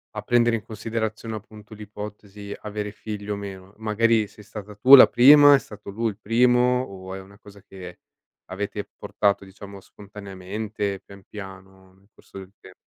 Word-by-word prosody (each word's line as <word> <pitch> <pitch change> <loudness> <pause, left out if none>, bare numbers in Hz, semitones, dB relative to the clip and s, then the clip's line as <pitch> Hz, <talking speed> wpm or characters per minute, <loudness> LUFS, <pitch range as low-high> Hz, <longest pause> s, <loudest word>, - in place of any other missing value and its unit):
a 105 - -4
prendere 120 0 +2
in 110 - -5
considerazione, 110 0 -5
appunto, 105 0 -12
l'ipotesi: 105 -1 -9
"avere 105 -1 -5
figli, 105 -2 -8
o 105 - -1
meno"? 95 -1 -9
Magari, 110 0 +1
sei 105 0 -17
stata 105 0 -10
tu 130 +6 +9
la 130 - +9
prima, 145 +3 +7
è - - +2
stato 105 -5 -12
lui 115 +3 -2
il 100 - -16
primo, 125 +3 +2
o 95 -5 -9
è - - -7
una 100 +1 -17
cosa 100 -2 -16
che 95 -2 -12 0.5
avete 100 +2 -5
portato, 100 -1 -1
diciamo, 100 0 -12
spontaneamente, 100 0 -7
pian, 100 0 -15
piano, 95 -2 -12
nel 95 +1 -28
corso - - -16
del 95 0 -13
tem - - -15
105 Hz, 170 wpm, -23 LUFS, 100-110 Hz, 0.5 s, tu